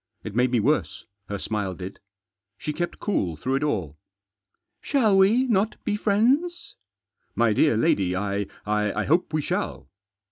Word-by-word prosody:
It - - -6
made 125 +3 +2
me 120 -1 +2
worse, 110 - 0 0.2
her 100 - -2
smile 100 -2 -3
did. 95 +2 -8 0.6
She 150 - -4
kept 175 +3 -3
cool 95 - -1
through 130 - -3
it 135 +2 +1
all. 90 - -2 0.4
" 95 0 -55
Shall 230 -8 +4
we 200 +6 +5
not 215 -3 +1
be 210 - 0
friends? 250 - +1 0.2
" 100 0 -65
" - - -48
My 115 -2 +3
dear 115 +1 +3
lady, 95 -5 +2
I 100 +1 -2
— - - -25
I 105 0 0
hope 165 - +1
we 155 -1 0
shall." - - -3
120 Hz, 175 wpm, -25 LUFS, -, 0.6 s, we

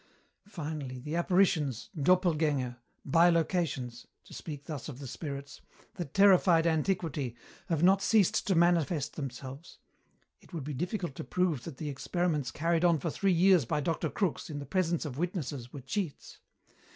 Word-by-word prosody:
"Finally, 150 -8 -5
the 150 +6 -5
apparitions, 170 - +1
doppelgänger, 150 -6 +2 0.3
bilocations 165 -6 +2 0.2
to - - -15
speak 145 -3 -7
thus 150 -3 -6
of 130 - -7
the 140 - -8
spirits 140 +1 -7 0.3
that 175 -7 -6
terrified 185 -4 +6
antiquity, 160 -6 0 0.3
have 165 -1 0
not 190 +2 +5
ceased 210 -4 +3
to 190 - +3
manifest 170 -3 +2
themselves. 135 +2 -7 0.6
It - - -21
would 160 -4 -4
be 150 +2 -4
difficult 175 - -3
to - - -4
prove 165 -1 0
that 160 -6 -7
the 150 - -4
experiments 150 0 -1
carried 165 +5 0
on 170 -2 +5
for 160 +2 -3
three 195 +4 +1
years 180 -1 +5
by 135 - 0
Dr. 165 +1 -1
Crookes 190 -6 -2
in 150 - -5
the 145 - -5
presence 175 -2 0
of 140 -2 -5
witnesses 145 - -3
were 140 - -8
cheats. 145 +5 -4
160 Hz, 155 wpm, -30 LUFS, 140-175 Hz, 0.6 s, terrified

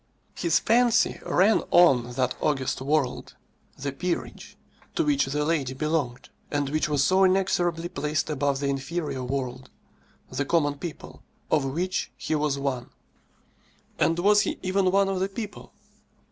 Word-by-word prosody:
His 170 -2 +1
fancy 235 0 +3
ran 200 +5 +3
on 125 -9 +5
that 125 0 0
august 135 -3 0
world, 140 -2 -1 0.4
the 140 +1 -3
peerage, 175 +6 -4 0.4
to 335 - +2
which 295 -2 +2
the 150 +2 -1
lady 145 -5 -1
belonged, 150 -4 -2 0.2
and 145 -2 -1
which 155 +1 0
was 145 -2 +2
so 190 +4 +4
inexorably 180 -3 +1
placed 150 -3 -2
above 145 -2 0
the 140 - 0
inferior 140 0 -3
world, 130 0 -4 0.6
the 140 - -1
common 145 -1 +1
people, 170 -4 -8 0.3
of 150 -3 +3
which 175 +7 -2
he - - -3
was 150 -2 0
one. 135 -3 -3 1.1
And 165 - +2
was 205 +4 +5
he - - -2
even 185 0 +2
one 195 +1 +3
of 195 -1 -1
the 190 +1 0
people? 205 +1 -7
150 Hz, 145 wpm, -26 LUFS, 135-185 Hz, 1.1 s, on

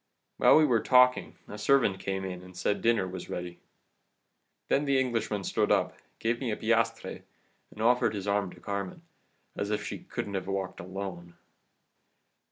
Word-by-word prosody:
"While - - +6
we 155 - +6
were 120 -6 +3
talking 125 0 +4
a 105 - -8
servant 105 -4 +3
came 95 0 -3
in 90 -1 -5
and 90 0 -13
said 100 - 0
dinner 115 -5 +2
was 90 0 -7
ready. 90 0 -5 1.1
Then 145 - +2
the 140 -1 +3
Englishman 115 -5 -1
stood - - 0
up, - - +2 0.2
gave 115 +1 -1
me 130 - -2
a 105 - -1
piastre, 115 +1 0 0.5
and 110 - -10
offered 120 -1 +3
his 100 0 -5
arm 100 -1 +1
to - - -15
Carmen, 100 - -5 0.5
as 100 - -3
if 105 -1 -1
she - - -5
couldn't 100 - -5
have 95 -1 -3
walked 95 -1 -3
alone. 90 -2 -7
100 Hz, 170 wpm, -29 LUFS, 95-115 Hz, 1.1 s, While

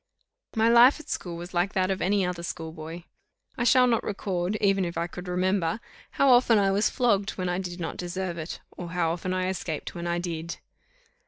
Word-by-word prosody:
My 220 0 +3
life 240 +5 +7
at 310 - -12
school 170 -2 -4
was 175 +2 -8
like 180 +2 +1
that 185 0 +1
of 190 - -2
any 195 0 +2
other 180 -1 -3
school 165 -1 -5
boy. 160 +2 -8 0.5
I 240 - -1
shall 250 +1 +6
not 235 -2 +2
record, 190 -1 -2
even 195 -2 +3
if 170 -1 -4
I 170 - 0
could 180 +1 -8
remember, 185 +2 0 0.3
how 275 - +3
often 245 -2 +6
I 195 -1 +3
was 200 +2 +2
flogged 205 -5 +1
when 185 -1 -1
I 180 +1 -1
did 180 -1 -5
not 165 - -4
deserve 175 -1 -4
it, 160 +2 -6
or 175 -1 -6
how 170 -2 +1
often 180 +2 -3
I 185 0 0
escaped 175 -4 -4
when 170 0 -5
I 170 0 0
did. 170 -1 -4
185 Hz, 215 wpm, -27 LUFS, 175-200 Hz, 0.5 s, life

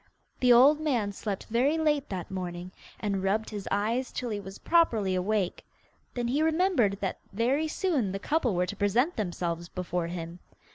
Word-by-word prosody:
The 250 -1 +4
old 270 +6 +7
man 245 -10 0
slept 200 -1 -4
very 260 +8 +2
late 295 -3 +1
that 185 0 -5
morning, 180 -1 -5 0.3
and 200 -3 -1
rubbed 205 +4 0
his 205 -3 -6
eyes 225 +6 0
till 245 -2 -4
he 210 - -2
was 195 0 -9
properly 230 - +2
awake. 185 0 -1 0.5
Then 240 -1 -1
he 280 +5 +1
remembered 320 - +2
that 190 - -2
very 260 +9 +1
soon 305 - 0
the 195 - -2
couple 250 - 0
were 180 +1 +2
to 180 - -5
present 230 - +1
themselves 175 -4 -3
before 180 -2 -3
him. 170 0 -6
210 Hz, 175 wpm, -28 LUFS, 190-265 Hz, 0.5 s, old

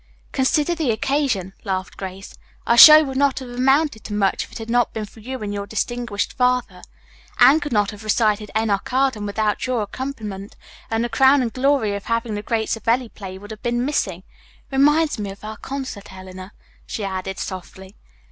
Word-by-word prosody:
"Consider 290 +5 +1
the 320 -6 -1
occasion," 225 -5 0
laughed 190 -2 -3
Grace. 190 0 -8 0.3
"Our 235 - +3
show 305 +6 +11
would 265 -2 -4
not 280 -1 +2
have 260 -2 -6
amounted 265 0 +1
to 205 - -4
much 195 -2 +1
if - - -22
it - - -7
had 225 -1 -7
not 240 +1 +1
been 220 -1 -3
for 210 - -17
you 260 +4 -6
and 205 -1 -4
your 200 0 -4
distinguished 230 -1 -2
father. 250 -7 0 0.6
Anne 290 +4 +7
could 290 -1 -5
not 205 -2 +1
have 210 0 -11
recited 215 -1 +1
'Enoch 210 -1 -1
Arden,' 255 -5 +1
without 210 +2 -1
your 245 -4 0
accompaniment, 210 -4 -6 0.3
and 225 +1 0
the - - 0
crowning 265 -1 +4
glory 255 -3 +1
of 200 - -7
having 230 -1 -1
the 205 - -3
great 220 0 -2
Savelli 230 +2 0
play 190 -3 -9
would 205 +2 -11
have 220 - -9
been 240 +1 -1
missing. 190 - -2 0.5
It - - -4
reminds 295 0 +3
me 205 -1 -3
of 195 +1 -11
our 215 0 -7
concert, 260 -9 -6
Eleanor," 185 +1 -10 0.3
she 215 - -4
added 190 0 -4
softly. 190 +1 -8
225 Hz, 190 wpm, -21 LUFS, 200-260 Hz, 0.6 s, show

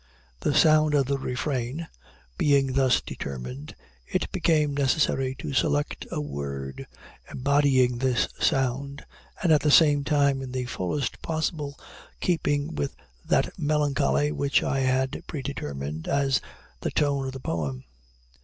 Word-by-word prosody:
The 145 - 0
sound 155 -1 +5
of 140 -2 +3
the 140 +1 -1
refrain 130 +3 -3 0.5
being 140 - +2
thus 130 -1 +3
determined, 65 +1 -7 0.3
it - - -2
became 150 -3 +2
necessary 135 -1 +1
to 75 - -6
select 75 +2 0
a - - -3
word 70 -2 -5 0.4
embodying 130 -3 +2
this 130 -2 +2
sound, 140 0 0 0.4
and 170 - +3
at 150 - +5
the 150 - +2
same 145 -1 +6
time 140 -2 +2
in 130 -1 -6
the 130 -1 -2
fullest 120 +3 -3
possible 155 -3 -2 0.4
keeping 145 -5 0
with 75 -1 -3 0.3
that - - +2
melancholy 140 - +1
which 140 - +1
I 135 +1 0
had 130 0 0
predetermined 80 - -5
as 140 -1 +2 0.4
the - - -2
tone 140 -2 0
of 130 - -5
the 135 - -6
poem. 75 - -3
135 Hz, 135 wpm, -26 LUFS, 115-145 Hz, 0.5 s, same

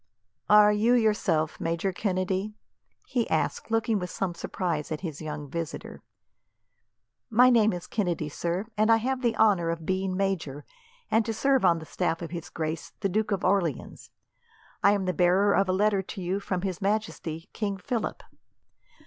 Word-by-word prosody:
"Are 210 0 +7
you 225 +4 +3
yourself 200 -9 +1
Major 170 +3 -1
Kennedy?" 190 +2 -1 0.5
he 240 -3 -1
asked, 160 - -1
looking 225 -1 +1
with 180 -1 -4
some 185 -3 -2
surprise 170 -3 -3
at 155 - -3
his 160 -5 -5
young 150 -1 -5
visitor. 165 +2 -6 1.3
"My 250 +2 +6
name 220 -2 +4
is 175 -1 -5
Kennedy, 175 -7 -1
sir, 170 +6 -2
and 215 +1 +3
I 225 - +7
have 255 +3 -2
the 235 -3 0
honour 190 -6 +3
of 165 -1 -3
being 190 0 -1
major, 165 -8 -2 0.5
and 225 - +4
to 225 - -2
serve 270 +2 +2
on 170 - +5
the 160 - -8
staff 170 0 -2
of 165 - -6
his 170 -2 -6
grace, 160 0 -4
the 195 - +1
Duke 215 +3 0
of 200 -3 -1
Orleans. 180 -7 -1 0.7
I 200 - +6
am 200 -2 -1
the 185 - 0
bearer 185 +4 +3
of 195 - +2
a - - +4
letter 200 +1 +2
to 190 +2 -8
you 185 +2 -1
from 185 -2 -3
His 190 -2 -3
Majesty, 195 -5 -2
King 200 -3 -2
Philip." 225 +3 -3
190 Hz, 175 wpm, -27 LUFS, 170-215 Hz, 1.3 s, Are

